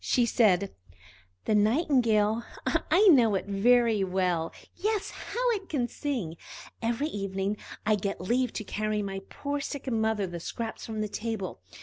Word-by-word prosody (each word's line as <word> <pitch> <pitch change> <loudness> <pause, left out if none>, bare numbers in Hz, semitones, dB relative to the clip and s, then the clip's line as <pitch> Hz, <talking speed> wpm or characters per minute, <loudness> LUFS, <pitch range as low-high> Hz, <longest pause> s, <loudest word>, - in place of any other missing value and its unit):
She 245 - +3
said: 200 -5 +3 0.7
"The - - +1
Nightingale? 225 -2 +3 0.2
I 410 +4 +3
know 235 - +6
it 190 - -1 0.6
well; 180 -3 0 0.2
yes, 420 +2 -1
how - - -1
it 400 -4 -3
can 255 -6 0
sing! 235 - -3 0.4
Every 235 +5 0
evening 195 -5 -2 0.3
I 215 0 +3
get 200 0 -3
leave 240 +6 +1
to - - -4
carry 215 +1 -1
my 195 -1 -4
poor 285 0 -3
sick 275 -1 -4
mother 220 -2 +1
the 175 -2 -6
scraps 225 +6 -5
from 220 -1 -3
the 215 - -1
table. 210 - -4
220 Hz, 145 wpm, -28 LUFS, 195-255 Hz, 0.7 s, know